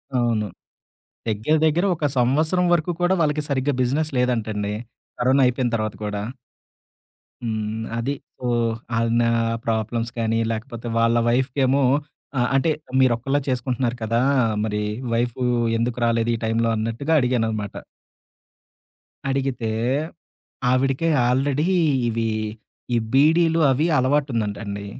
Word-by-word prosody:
అవును. 115 -4 +1 0.8
దగ్గర 110 +8 +1
దగ్గర 165 +5 +2
ఒక 155 - -2
సంవత్సరం 155 +9 +2
వరకు 170 +1 +1
కూడా 175 +2 +3
వాళ్ళకి 150 -1 +1
సరిగ్గా 140 +1 +1
బిజినెస్ 145 +5 0
లేదంటండి. 110 -4 0 0.5
కరోనా 130 +3 +3
అయిపోయిన 125 0 0
తర్వాత 110 -2 -2
కూడా. 105 -1 -3 1.2
హ్మ్. 110 -1 -3 0.2
అది. 130 +5 -1 0.3
ఓహ్! 120 -1 +1 0.2
అయన 115 +1 +2 0.4
ప్రాబ్లమ్స్ 115 +1 -1
కానీ, 115 0 +1
లేకపోతే 115 +1 -5
వాళ్ళ 115 +1 +3
వైఫ్‌కెమో 130 +2 +2 0.5
ఆహ్, 125 0 +2
అంటే 135 +4 +2 0.3
మీరొక్క‌లే 130 +2 +2
చేసుకుంటున్నారు 125 -1 -1
కదా! 115 +1 +1 0.4
మరి 105 -1 -1 0.3
వైఫు 120 +2 -1 0.3
ఎందుకు 115 +1 -1
రాలేదు 115 0 +1
ఈ - - -3
టైంలో 115 +1 +1
అన్నట్టుగా 115 +8 -1
అడిగాననమాట. 110 -5 -1 1.5
అడిగితే, 135 -4 -1 1.0
ఆవిడకే 135 +5 +1 0.2
ఆల్రెడీ 135 +4 +1 0.4
ఇవి 115 0 -1 0.6
ఈ - - +3 0.2
బీడీలు 165 +4 +4
అవి 150 +6 +1
అలవాటు 140 +2 +1
ఉందంట 105 -3 -1
అండి. 100 0 -5
120 Hz, 115 wpm, -22 LUFS, 115-135 Hz, 1.5 s, బీడీలు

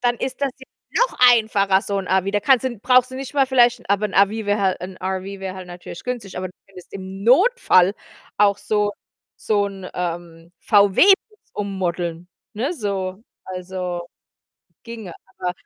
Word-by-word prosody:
dann 240 -1 +1
ist 260 +2 -4
das 280 -1 +1
jetzt 265 - -15 0.4
noch - - -15
einfacher, 200 -4 +2
so 200 0 -2
‘n 190 - -5
RV. 190 +1 +1
Da 205 - +1
kannst 260 +3 +3
du 250 -2 -2
brauchst 255 +4 +3
du 260 - -8
nicht 270 +1 -7
mal 275 -2 +3
vielleicht 240 -3 +3
aber 200 +1 +2
‘n 200 - -10
RV 200 +1 +5 0.2
wär 205 0 +1
halt 190 -2 +1
‘n 185 +1 -7
RV 190 0 -3 0.2
wäre 190 -1 -5
halt 185 -1 -9
natürlich 175 -1 -10
günstig, 240 -6 -5
aber 185 0 -3
du - - -16
könntest 185 -2 -15
im 190 0 -8
Notfall 240 - +4 0.4
auch 205 -1 +3
so 205 0 0 0.4
so 205 -2 0
‘n, 195 -2 -8
ähm, 170 -1 -5
VW-Bus 375 - +3
ummodeln, 180 -4 -3 0.3
ne? 250 +10 -1
So, 195 - -4 0.2
also 180 -1 -5 0.8
ginge, 225 -6 -8 0.3
aber 180 - -2
200 Hz, 175 wpm, -21 LUFS, 185-235 Hz, 0.8 s, RV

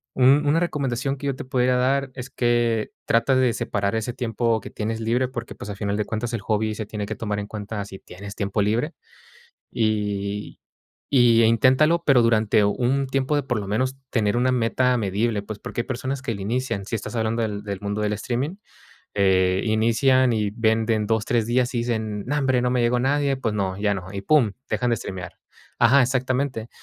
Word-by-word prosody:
un 135 +3 +5
-una 150 +3 +3
recomendación 135 -5 -1
que 140 - -5
yo 135 - -1
te - - -7
pudiera 125 -1 +1
dar 135 +2 +1
es 130 0 -7
que 120 -2 +1
trates 130 +3 +3
de 125 -3 +3
separar 100 +1 -1
ese 110 +2 -2
tiempo 115 -2 0
que - - -10
tienes 110 +1 -3
libre 120 +3 +1
porque, 120 -2 -6
pues, - - -9
a 100 - -4
final 100 0 -2
de 105 - -1
cuentas 115 +2 -3
el 115 - -2
hobby 110 +1 0
se 105 0 -5
tiene 105 -1 -4
que - - -5
tomar 105 -2 -3
en 100 - -4
cuenta 105 -1 -5
si 95 -1 -10
tienes 100 +3 -10
tiempo 100 0 -1
libre. 120 +10 0 0.8
Y, 105 -2 -2 0.5
eh, 115 -3 +6
inténtalo, 130 +9 +3
pero 135 -4 +6
durante 110 -2 +3
un 125 +6 +1
tiempo 135 +2 0
de 145 - +1
por 120 -3 -2
lo 100 - -6
menos 130 +6 -1
tener 105 -4 +1
una 130 +1 +2
meta 125 +1 +2
medible, 105 0 0
pues 105 0 -7
porque 120 - -4
hay - - -15
personas 130 +2 -3
que 135 - -2
inician, 110 0 -2
si 115 - -4
estás 110 - -7
hablando 115 +1 0
del 100 -3 -4
mundo 100 +1 -2
del 105 0 0
streaming, 125 - -3 0.6
eh, 95 -2 +3
inician 115 +3 +3
y 105 -2 0
venden 110 0 +1
2 110 0 +1
3 115 -2 +1
días 125 +1 +1
y - - 0
dicen: 110 -3 -2
"Nombre, 135 -2 +1
no 125 - +1
me 125 -1 +1
llegó 120 +1 +2
nadie, 140 +1 +1
pues 115 -5 -2
no, 95 -2 -2
ya 105 0 +1
no". 95 0 -7
Y 100 - -4
pum, 125 -4 +3 0.2
dejan 120 +3 0
de 115 - +2
streamear. 95 -4 -7 0.4
Ajá, 130 +4 +6
exactamente. 130 -2 -1
115 Hz, 200 wpm, -23 LUFS, 105-130 Hz, 0.8 s, eh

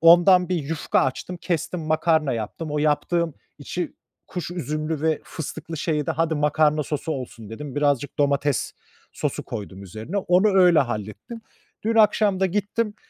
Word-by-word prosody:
ondan 175 +2 +7
bir 180 - +1
yufka 155 +1 0
açtım. 135 +7 -2
Kestim, 175 0 -2
makarna 155 -2 +2
yaptım. 120 +8 -4
O 150 - -1
yaptığım 155 +2 +1 0.2
içi, 175 +5 -4 0.3
kuş 180 -1 -5
üzümlü 155 -2 -3
ve 160 -1 +1
fıstıklı 160 +1 -6
şeyi 150 -1 -1
de - - 0
"Hadi, 165 0 +1
makarna 150 +1 +2
sosu 150 +2 -3
olsun." 115 -5 -7
dedim. 140 +5 -7
Birazcık 145 -1 0
domates 140 -1 +1 0.4
sosu - - -2
koydum 100 -3 -7
üzerine; 110 - -6
onu 190 +1 +3
öyle 180 -4 +6
hallettim. 115 - -3 0.4
Dün 225 +2 0
akşam 210 -3 +4
da 190 - +4
gittim, 210 +3 -1
155 Hz, 150 wpm, -24 LUFS, 145-180 Hz, 0.4 s, ondan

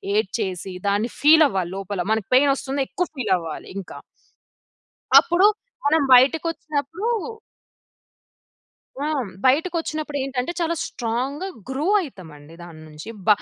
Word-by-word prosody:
ఏడ్చేసి 190 -3 -2 0.2
దాన్ని 210 +4 0
ఫీల్ 310 +1 +7
అవ్వాలి 190 -4 -1
లోపల. 195 -1 -4
మనకు 220 -3 0
పెయిన్ 275 +1 +5
వస్తున్నా 275 0 -2
ఎక్కువ 360 -2 -2
ఫీల్ 245 - -2
అవ్వాలి 165 -2 -7
ఇంకా. 195 - -8 1.2
అప్పుడు 345 +4 +2 0.4
మనం 310 +1 +4
బయటకొచ్చినప్పుడు 315 - +2 2.0
ఆ! - - -1 0.4
బయటకు 320 +7 +3
వచ్చినప్పుడు 310 -2 -4
ఏంటంటే 265 +3 -2
చాలా 335 0 0
స్ట్రాంగ్‌గా 255 +9 -3 0.2
గ్రో 275 +4 -2 0.2
అయితామండి 165 - -11
దాని 160 -2 -12
నుంచి. 155 +7 -10 0.2
బ - - -16
265 Hz, 115 wpm, -22 LUFS, 195-310 Hz, 2.0 s, ఫీల్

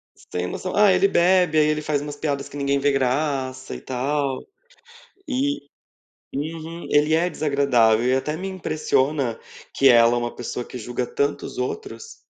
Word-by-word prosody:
Sem 90 0 -5
noção, 185 - -4
ah, 205 -1 +6
ele 185 +2 +4
bebe, 180 -3 +3
aí 150 - +5
ele 155 0 0
faz 150 -1 0
umas 145 0 -6
piadas 145 -2 -3
que - - -13
ninguém 140 0 +1
vê 145 +1 +2
graça 130 -1 -1
e - - -9
tal. 135 +1 -2 0.8
E 285 +1 0 0.8
uhum. 160 +3 -5
Ele 150 +1 +3
é 170 +3 +2
desagradável 135 -8 +2
e 130 - +3
até 150 +4 -1
me 185 +4 -5
impressiona 150 -8 -1 0.3
que 135 - +4
ela 120 -1 +6
é - - +1
uma 120 0 -3
pessoa 120 0 -5
que - - -8
julga 120 +2 -3
tanto 140 +4 -1
os - - -8
outros 400 - -5
145 Hz, 170 wpm, -23 LUFS, 130-160 Hz, 0.8 s, ah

